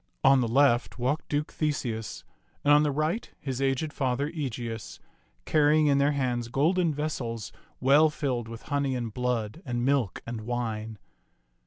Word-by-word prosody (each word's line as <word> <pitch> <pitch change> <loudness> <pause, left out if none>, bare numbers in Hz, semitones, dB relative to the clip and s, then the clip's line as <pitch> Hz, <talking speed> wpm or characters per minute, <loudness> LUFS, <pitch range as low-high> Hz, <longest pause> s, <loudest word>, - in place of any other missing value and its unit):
On 135 -1 +6
the 120 - +1
left 125 0 +3
walked 130 +5 -1
Duke 150 +1 -1
Theseus, 120 -8 -2 0.4
and 145 - +5
on 150 - +6
the 150 - +2
right 155 +9 -1
his 135 -2 -4
aged 135 +3 0
father 135 +2 0
Egeus, 115 - -5 0.5
carrying 155 0 +4
in 140 -1 +4
their 140 +1 +3
hands 125 -4 -1
golden 165 +7 +2
vessels 130 -7 -3 0.3
well 145 +5 +5
filled 135 -6 -2
with 115 0 -9
honey 140 -2 -1
and 120 -3 -4
blood 125 +2 -2
and 120 -3 -2
milk 135 -7 0
and 115 -1 -5
wine. 110 -2 -3
135 Hz, 155 wpm, -28 LUFS, 120-145 Hz, 0.5 s, On